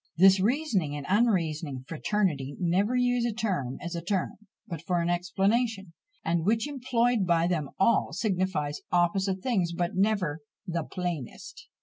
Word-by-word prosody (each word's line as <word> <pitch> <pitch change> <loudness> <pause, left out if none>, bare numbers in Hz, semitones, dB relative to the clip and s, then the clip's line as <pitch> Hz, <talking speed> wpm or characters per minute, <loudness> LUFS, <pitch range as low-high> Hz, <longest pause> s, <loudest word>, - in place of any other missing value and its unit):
This 190 +2 +7
reasoning 205 - 0
and 145 -1 -5
unreasoning 165 - +1
fraternity 155 -6 -1
never 190 +7 +1
use 245 -1 +2
a 240 - +1
term 185 - -2
as 170 0 -6
a 170 - -3
term, 185 +1 -1 0.4
but 165 -4 -6
for 175 0 0
an 170 +1 0
explanation, 195 +2 0 0.3
and 165 0 +1
which 220 - +1
employed 245 -6 +1
by 170 -1 +3
them 160 -5 -1
all, 225 +5 +3
signifies 185 -8 -1
opposite 190 +2 +1
things, 190 -9 0
but 175 0 -1
never 190 -5 +1 0.3
the 170 -3 -2
plainest! 175 -7 -6
185 Hz, 145 wpm, -28 LUFS, 170-215 Hz, 0.4 s, This